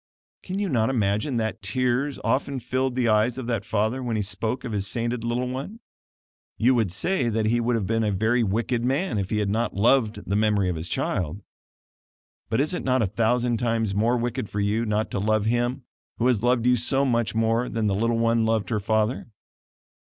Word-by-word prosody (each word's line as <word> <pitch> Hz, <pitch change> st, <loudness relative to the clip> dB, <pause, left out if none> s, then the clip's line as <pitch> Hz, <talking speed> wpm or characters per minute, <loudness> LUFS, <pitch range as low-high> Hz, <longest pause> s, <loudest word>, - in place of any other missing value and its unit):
Can 185 Hz, +1 st, -5 dB
you 200 Hz, 0 st, 0 dB
not 115 Hz, -7 st, +1 dB
imagine 110 Hz, +2 st, 0 dB
that 110 Hz, -1 st, -2 dB
tears 125 Hz, +7 st, 0 dB
often 130 Hz, +4 st, 0 dB
filled 130 Hz, +1 st, -1 dB
the 125 Hz, -2 st, +1 dB
eyes 110 Hz, +3 st, +2 dB
of 130 Hz, -, -4 dB
that 115 Hz, -4 st, -1 dB
father 110 Hz, +5 st, -1 dB
when 120 Hz, -3 st, -2 dB
he 105 Hz, -, 0 dB
spoke 110 Hz, +5 st, -3 dB
of 125 Hz, -, -5 dB
his 100 Hz, -2 st, -1 dB
sainted 120 Hz, +1 st, -2 dB
little 120 Hz, +2 st, -1 dB
one? 135 Hz, -, -5 dB, 0.8 s
You 120 Hz, +4 st, +4 dB
would 110 Hz, -7 st, +1 dB
say 130 Hz, -, 0 dB
that 110 Hz, -1 st, 0 dB
he 120 Hz, +2 st, +2 dB
would 120 Hz, +1 st, +1 dB
have 110 Hz, -4 st, -1 dB
been 115 Hz, +2 st, 0 dB
a 105 Hz, -, +1 dB
very 110 Hz, +5 st, +1 dB
wicked 115 Hz, +3 st, -1 dB
man 135 Hz, -, 0 dB
if 95 Hz, -1 st, -3 dB
he 110 Hz, -, 0 dB
had 105 Hz, -2 st, 0 dB
not 115 Hz, +3 st, -1 dB
loved 110 Hz, -1 st, +2 dB
the 100 Hz, -, 0 dB
memory 105 Hz, -3 st, +2 dB
of 90 Hz, -, -2 dB
his 80 Hz, +2 st, -5 dB
child. 90 Hz, +4 st, -2 dB, 1.1 s
But 110 Hz, -, 0 dB
is 150 Hz, +5 st, +1 dB
it -, -, -3 dB
not 130 Hz, -2 st, +2 dB
a -, -, +2 dB
thousand 115 Hz, +4 st, +1 dB
times 115 Hz, -3 st, 0 dB
more 115 Hz, +5 st, +2 dB
wicked 120 Hz, -1 st, -3 dB
for 105 Hz, -, -3 dB
you 105 Hz, +3 st, 0 dB
not 105 Hz, +1 st, -1 dB
to -, -, -1 dB
love 110 Hz, +1 st, +1 dB
Him 120 Hz, +3 st, 0 dB, 0.3 s
who 120 Hz, -, 0 dB
has 125 Hz, -5 st, +3 dB
loved 120 Hz, 0 st, +2 dB
you 125 Hz, 0 st, +4 dB
so 135 Hz, +4 st, +1 dB
much 115 Hz, -4 st, 0 dB
more 115 Hz, +2 st, +1 dB
than 115 Hz, -1 st, -1 dB
that 100 Hz, -, +2 dB
little 115 Hz, +4 st, +1 dB
one 115 Hz, 0 st, +2 dB
loved 110 Hz, -3 st, 0 dB
her 110 Hz, -, +1 dB
father? 110 Hz, +4 st, 0 dB
115 Hz, 215 wpm, -25 LUFS, 105-125 Hz, 1.1 s, You